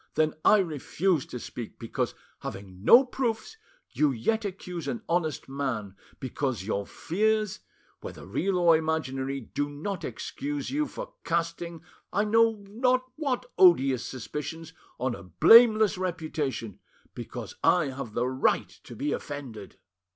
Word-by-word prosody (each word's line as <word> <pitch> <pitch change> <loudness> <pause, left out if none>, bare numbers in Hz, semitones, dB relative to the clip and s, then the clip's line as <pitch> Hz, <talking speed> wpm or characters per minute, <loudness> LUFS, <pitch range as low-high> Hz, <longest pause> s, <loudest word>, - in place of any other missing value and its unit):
then 155 0 +2
I 215 - +7
refuse 165 -1 0
to - - -6
speak, 120 -1 -7
because, 115 - -3 0.2
having 95 -1 -8
no 250 - +8
proofs, 245 - -3 0.3
you 150 - +2
yet 220 - 0
accuse 180 -5 -5
an 225 +8 -3
honest 165 -3 -1
man; 130 -8 -3 0.2
because 130 -4 -2
your 100 -1 -2
fears, 215 +3 0 0.4
whether - - -9
real 195 -1 0
or 170 -2 +6
imaginary, 140 -4 -1
do 145 +5 -3
not 165 +6 -5
excuse 145 -1 -4
you 300 +2 0
for - - -8
casting, 170 0 -2 0.3
I 205 - +2
know 225 -1 +3
not 255 +4 +1
what 270 -5 -1
odious 135 -9 +6
suspicions, 150 +5 -6 0.3
on 125 0 0
a - - -8
blameless 215 - +6
reputation, 155 - -3 0.3
because - - -7
I 170 -6 +4
have 130 -4 -6
the 120 +1 +1
right 130 +1 +1 0.2
to 120 - -10
be 145 +6 -2
offended. 125 -11 -6
160 Hz, 135 wpm, -28 LUFS, 130-205 Hz, 0.4 s, no